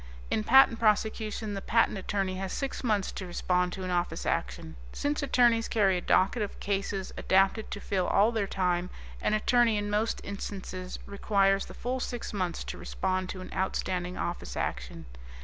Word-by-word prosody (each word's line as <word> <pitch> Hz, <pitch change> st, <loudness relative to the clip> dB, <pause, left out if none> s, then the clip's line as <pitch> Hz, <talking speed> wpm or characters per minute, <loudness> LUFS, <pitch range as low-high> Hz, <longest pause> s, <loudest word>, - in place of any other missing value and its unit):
In 215 Hz, -, +1 dB
patent 245 Hz, 0 st, +6 dB
prosecution, 215 Hz, 0 st, 0 dB
the 195 Hz, -, -4 dB
patent 230 Hz, +1 st, +2 dB
attorney 195 Hz, -1 st, -2 dB
has 190 Hz, -1 st, -4 dB
six 275 Hz, -1 st, -3 dB
months 210 Hz, -5 st, +1 dB
to 190 Hz, -, -6 dB
respond 180 Hz, 0 st, 0 dB
to 190 Hz, -, -5 dB
an 185 Hz, -, -3 dB
Office 175 Hz, 0 st, -1 dB
Action. 65 Hz, 0 st, -2 dB, 0.2 s
Since 290 Hz, +1 st, -1 dB
attorneys 240 Hz, -4 st, +3 dB
carry 195 Hz, -4 st, +3 dB
a 180 Hz, -, -1 dB
docket 195 Hz, +7 st, +2 dB
of 205 Hz, -, -4 dB
cases 195 Hz, -1 st, -2 dB
adapted 195 Hz, +3 st, +2 dB
to 205 Hz, -, -5 dB
fill 190 Hz, -3 st, -1 dB
all 210 Hz, +4 st, +4 dB
their 220 Hz, -4 st, -1 dB
time, 180 Hz, -1 st, 0 dB, 0.3 s
an 215 Hz, -, +2 dB
attorney 230 Hz, 0 st, +3 dB
in 205 Hz, 0 st, -2 dB
most 215 Hz, +2 st, 0 dB
instances 190 Hz, -2 st, -6 dB
requires 195 Hz, -1 st, +1 dB
the -, -, -11 dB
full 255 Hz, +2 st, -2 dB
six 245 Hz, -2 st, -4 dB
months 185 Hz, -4 st, -2 dB
to -, -, -7 dB
respond 185 Hz, -1 st, -2 dB
to 185 Hz, -, -5 dB
an 185 Hz, -, -9 dB
outstanding 185 Hz, -1 st, -2 dB
Office 175 Hz, -, -4 dB
Action. -, -, -4 dB
195 Hz, 175 wpm, -29 LUFS, 185-220 Hz, 0.3 s, patent